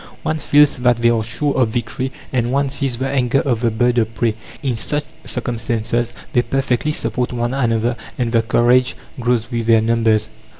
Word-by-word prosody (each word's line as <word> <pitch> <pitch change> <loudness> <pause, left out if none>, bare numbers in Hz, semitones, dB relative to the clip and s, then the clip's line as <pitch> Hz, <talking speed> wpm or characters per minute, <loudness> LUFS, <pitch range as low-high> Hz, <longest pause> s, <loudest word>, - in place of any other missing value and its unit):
One 155 0 -1
feels 145 0 +4
that 125 -1 +3
they 120 0 +3
are 115 -2 +1
sure 140 +6 -1
of 125 -4 +2
victory, 125 +3 -3 0.2
and 120 -1 +1
one 140 0 +1
sees 135 -4 -1
the 130 +2 -2
anger 135 -1 +1
of 120 -5 0
the 120 - +2
bird 120 +2 +2
of 110 0 -1
prey. 115 0 +1 0.3
In 130 -4 0
such 145 +7 -2 0.2
circumstances 120 -1 -2 0.2
they 120 - +4
perfectly 130 +2 -1
support 125 -4 -2
one 120 0 -2
another, 120 -2 +1 0.2
and 120 -3 -1
their 115 -1 +3
courage 120 +3 +3 0.2
grows 120 0 0
with 115 -1 -2
their 115 -1 +5
numbers." 110 -1 +2
120 Hz, 185 wpm, -19 LUFS, 115-130 Hz, 0.3 s, their